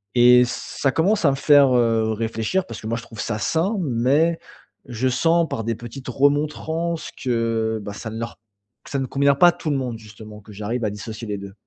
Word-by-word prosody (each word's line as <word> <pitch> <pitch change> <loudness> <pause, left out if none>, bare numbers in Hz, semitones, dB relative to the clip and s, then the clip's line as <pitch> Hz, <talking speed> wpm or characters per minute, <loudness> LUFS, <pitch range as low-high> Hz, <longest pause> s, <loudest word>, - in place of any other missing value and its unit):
et 125 0 +7
ça 130 +2 -2
commence 190 +5 +2
à 140 - +5
me - - -1
faire, 140 -2 +5
heu, 115 -2 +2
réfléchir 115 - -1
parce 115 -2 -8
que 110 - -7
moi 115 +1 -1
je 115 - -7
trouve 115 -2 -13
ça 105 +1 -2
sain, 165 - 0
mais 145 +4 +1 0.5
je 125 +1 -2
sens 165 +7 +2
par 115 - -3
des 115 0 -1
petites 120 +4 -10
remontrances 155 +5 0
que, 115 -2 0
bah, 105 - -6
ça 110 +2 -7
ne 110 - -7
leur 115 0 -6 0.5
ça 140 - -3
ne 135 - -1
convient 140 +2 +2
pas 175 +6 +6
à - - +2
tout 170 -2 -5
le 145 - +1
monde, 125 -4 -4
justement, 105 -1 -12
que 105 +1 -14
j'arrive 110 +4 -3
à - - +1
dissocier 110 +2 -7
les 105 -1 -3
2. 100 0 -9
120 Hz, 215 wpm, -22 LUFS, 110-145 Hz, 0.5 s, et